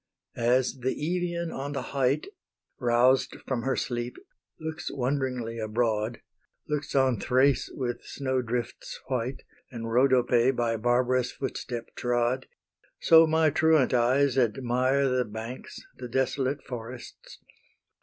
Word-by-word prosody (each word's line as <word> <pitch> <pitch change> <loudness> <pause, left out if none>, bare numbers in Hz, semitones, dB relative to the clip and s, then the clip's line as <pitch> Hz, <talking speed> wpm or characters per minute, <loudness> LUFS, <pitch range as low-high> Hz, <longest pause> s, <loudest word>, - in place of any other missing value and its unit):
As 125 +2 +1
the 130 +1 0
Evian 170 +1 -2
on 140 +2 -4
the 140 - -5
height, 135 +2 +1 0.5
Roused 125 +2 +3
from 130 -3 -1
her 135 +2 0
sleep, 120 -1 -3 0.4
looks 160 +1 -5
wonderingly 125 -3 -2
abroad, 110 0 -1 0.5
Looks 150 -2 -3
on 130 -5 +3
Thrace 130 +1 +2
with 120 -2 -4
snow 130 -2 -2
drifts 120 0 -4
white, 130 0 -2 0.3
And 115 -2 -6
Rhodope 125 0 +3
by 115 -1 +1
barbarous 125 +2 +1
footstep 120 -3 -5
trod, 120 +1 0 0.5
So 165 0 +7
my 160 -1 +3
truant 155 -4 +3
eyes 130 +2 +3
admire 130 +3 +1
The 125 -1 +1
banks, 110 +4 -7 0.2
the 125 - -6
desolate 130 +2 -1
forests. 120 0 -9
130 Hz, 120 wpm, -27 LUFS, 120-135 Hz, 0.5 s, So